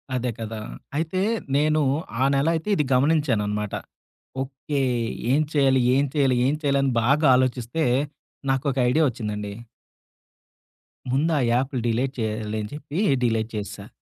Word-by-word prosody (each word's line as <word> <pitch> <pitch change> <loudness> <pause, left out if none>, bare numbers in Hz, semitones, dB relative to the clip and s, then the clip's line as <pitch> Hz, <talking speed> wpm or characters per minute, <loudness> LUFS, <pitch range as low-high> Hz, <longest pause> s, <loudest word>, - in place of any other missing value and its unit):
అదే 125 0 -1
కదా! 110 -1 -5 0.4
అయితే 165 +4 -1 0.3
నేను 155 +2 +3 0.4
ఆ - - +4
నెల 140 +3 +2
అయితే 165 +6 -3
ఇది 150 - +2
గమనించాననమాట. 120 -8 +1 0.7
ఓకే. 135 +2 -3 0.5
ఏం 145 +3 +4
చేయాలి? 135 -3 +4 0.2
ఏం 140 +1 +3
చేయాలి? 135 -4 +3
ఏం 145 - +1
చేయాలిని 140 -2 +2
బాగా 140 +5 +3
ఆలోచిస్తే, 130 +3 0 0.7
నాకొక 135 0 -1
ఐడియా 155 +6 +3
వచ్చిందండి. 105 -3 -5 1.6
ముందు 145 +6 +2
ఆ - - +1
యాప్లు 130 +2 0
డిలేట్ 125 +4 0
చేయాలి 110 -1 -2
అని 105 - -6
చెప్పి 150 +1 -7 0.3
డిలేట్ 115 -2 +1
చేసా. 105 -1 -6
135 Hz, 130 wpm, -24 LUFS, 115-145 Hz, 1.6 s, ఆ